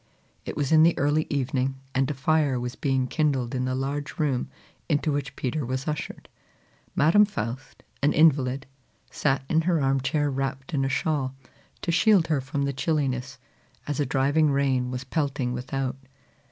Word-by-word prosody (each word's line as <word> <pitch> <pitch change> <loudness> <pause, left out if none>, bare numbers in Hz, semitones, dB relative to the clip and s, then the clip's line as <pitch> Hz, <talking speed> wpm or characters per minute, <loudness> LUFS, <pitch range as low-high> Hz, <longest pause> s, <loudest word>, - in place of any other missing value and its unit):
It - - -5
was 145 -1 -1
in 160 -1 +7
the 165 +1 +5
early 145 +2 +1
evening, 135 -1 -1 0.2
and 135 0 +1
a 150 - -2
fire 140 -1 +2
was 125 0 -4
being 135 -2 0
kindled 135 -4 0
in 130 -1 -1
the 130 0 -1
large 140 +4 -3
room 140 -6 0 0.4
into 150 0 +1
which 140 -1 -3
Peter 140 +4 -2
was 130 +2 -3
ushered. 150 0 -4 0.7
Madam 165 +8 +5
Faust, 125 - -5 0.2
an 145 - +3
invalid, 140 -3 +3 0.5
sat 135 -2 0
in 160 +3 +2
her 170 0 +1
arm 135 -1 +1
chair 145 +2 0
wrapped 135 +1 -3
in 135 -2 +1
a 135 - 0
shawl, 135 -2 -1 0.5
to 170 - 0
shield 195 0 +4
her 150 -4 +1
from 135 +2 -3
the 140 0 -1
chilliness, 130 -3 -1 0.5
as 145 -1 -3
a 145 - +2
driving 145 +4 +2
rain 135 -3 +1
was 125 0 -4
pelting 135 -2 -1
without. 130 +1 -3
135 Hz, 170 wpm, -26 LUFS, 130-150 Hz, 0.7 s, in